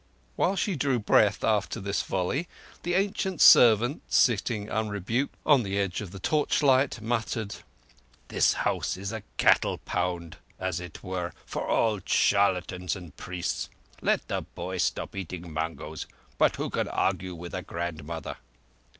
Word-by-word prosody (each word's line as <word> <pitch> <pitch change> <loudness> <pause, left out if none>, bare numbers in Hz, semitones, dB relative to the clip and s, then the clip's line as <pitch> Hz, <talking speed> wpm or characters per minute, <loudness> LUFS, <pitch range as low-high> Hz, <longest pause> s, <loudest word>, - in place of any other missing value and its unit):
While 190 - +1
she 195 -1 0
drew 135 -3 +1
breath 105 -2 +3
after 105 -2 +1
this 100 +1 -1
volley, 95 - -1 0.3
the 175 0 -1
ancient 190 -2 0
servant, 120 +4 +7
sitting 110 -2 +2
unrebuked 110 +4 -1
on 145 -4 +6
the 100 -2 -2
edge 100 -2 -1
of 100 - -6
the 95 - -9
torchlight, 140 +2 +2
muttered: 110 -2 -2 0.7
"This - - +3
house - - 0
is 100 +2 -4
a 110 -1 -5 0.2
cattle - - +4
pound, 90 -2 -3 0.2
as 95 -2 -2
it 90 -2 -9
were, 90 -3 -3
for - - -4
all 110 -3 +2
charlatans 90 -2 +2
and—priests. 90 0 -5 0.3
Let - - +1
the - - -1
boy 95 0 -6
stop 80 - -1
eating 90 -3 -6
mangoes... 80 -1 -4 0.3
but - - +4
who - - -3
can - - -1
argue 90 -1 -1
with 85 +1 -8
a - - -3
grandmother?" 85 -1 -5
100 Hz, 140 wpm, -27 LUFS, 90-115 Hz, 0.7 s, servant